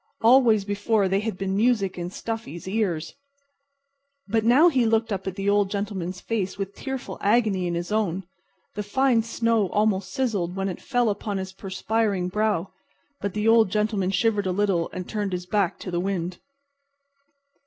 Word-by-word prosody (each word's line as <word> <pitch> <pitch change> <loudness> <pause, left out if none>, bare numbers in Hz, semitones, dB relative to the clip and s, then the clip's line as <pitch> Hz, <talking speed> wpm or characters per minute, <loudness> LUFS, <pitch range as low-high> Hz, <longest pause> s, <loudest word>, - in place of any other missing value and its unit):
Always 230 -4 +5
before 205 0 +1
they 195 +1 +1
had 215 -2 -3
been 190 0 -2
music 210 -3 +2
in 175 0 -4
Stuffy's 225 -3 -6
ears. 185 -6 -1 1.1
But 220 +1 +1
now 255 +9 +6
he 265 -8 +3
looked 225 -1 +1
up 195 0 -4
at 190 - -3
the 195 +1 -3
Old 205 -1 +3
Gentleman's 195 -3 -3
face 200 -4 -2
with 195 0 -4
tearful 265 -2 -6
agony 205 -4 +2
in 170 - -2
his 175 +3 -4
own. 195 -4 0 0.5
The 210 - -3
fine 240 +3 +2
snow 230 -3 +1
almost 205 -2 +1
sizzled 205 -10 -1
when 195 0 -1
it 180 - -6
fell 245 -4 +1
upon 205 0 -3
his 190 0 -5
perspiring 195 0 -1
brow. 210 -2 0 0.5
But 200 -1 -4
the 210 +1 0
Old 225 -3 +5
Gentleman 210 -2 0
shivered 205 +1 +1
a - - +1
little 185 -3 +1
and 185 -1 -6
turned 205 -3 -2
his 180 0 -3
back 195 -1 0
to 185 - -5
the 175 - 0
wind. 180 -2 -2
200 Hz, 175 wpm, -25 LUFS, 190-225 Hz, 1.1 s, now